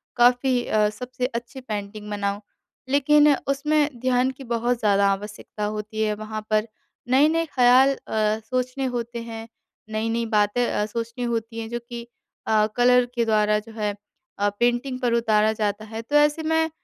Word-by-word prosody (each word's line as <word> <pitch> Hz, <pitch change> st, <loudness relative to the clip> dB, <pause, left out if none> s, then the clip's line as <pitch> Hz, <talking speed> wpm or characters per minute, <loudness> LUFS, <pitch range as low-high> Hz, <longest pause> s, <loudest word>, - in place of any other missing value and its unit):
काफ़ी 245 Hz, +1 st, +3 dB
अ, 210 Hz, -1 st, +2 dB
सबसे 250 Hz, +4 st, -5 dB
अच्छी 245 Hz, +1 st, -5 dB
पेंटिंग 210 Hz, -2 st, -6 dB
बनाऊँ, 200 Hz, 0 st, -2 dB, 0.5 s
लेकिन 290 Hz, +1 st, +5 dB
उसमें 290 Hz, -1 st, +1 dB
ध्यान 255 Hz, +1 st, +2 dB
की 265 Hz, +1 st, -12 dB
बहुत 240 Hz, 0 st, -1 dB
ज़्यादा 200 Hz, -2 st, +3 dB
आवश्यकता 210 Hz, +1 st, -5 dB
होती 215 Hz, +1 st, -4 dB
है। 215 Hz, -, +1 dB
वहाँ 215 Hz, 0 st, -6 dB
पर 215 Hz, +1 st, +1 dB, 0.4 s
नए-नए 310 Hz, +5 st, +4 dB
ख़्याल 255 Hz, +2 st, +6 dB
अ, 215 Hz, 0 st, 0 dB
सोचने 255 Hz, +3 st, -2 dB
होते 235 Hz, 0 st, -4 dB
हैं, 225 Hz, -1 st, -8 dB, 0.4 s
नई-नई 225 Hz, +2 st, -1 dB
बातें 215 Hz, +2 st, +1 dB
अ, 210 Hz, -, 0 dB
सोचनी 230 Hz, +3 st, -5 dB
होती 230 Hz, -1 st, -3 dB
हैं, 225 Hz, -, -5 dB
जो 240 Hz, +1 st, -3 dB
कि 235 Hz, -1 st, -7 dB, 0.4 s
अ, 215 Hz, -1 st, +4 dB
कलर 250 Hz, 0 st, +5 dB
के 235 Hz, -, +1 dB
द्वारा 210 Hz, -1 st, +2 dB
जो 225 Hz, +1 st, -13 dB
है 210 Hz, -2 st, -2 dB, 0.5 s
अ, 205 Hz, 0 st, +2 dB
पेंटिंग 245 Hz, +2 st, 0 dB
पर 245 Hz, -2 st, 0 dB
उतारा 220 Hz, -2 st, +3 dB
जाता 210 Hz, 0 st, -2 dB
है, 220 Hz, +1 st, -6 dB
तो 290 Hz, +6 st, -4 dB
ऐसे 295 Hz, +2 st, +4 dB
मैं 320 Hz, 0 st, +1 dB
235 Hz, 165 wpm, -24 LUFS, 215-255 Hz, 0.5 s, ख़्याल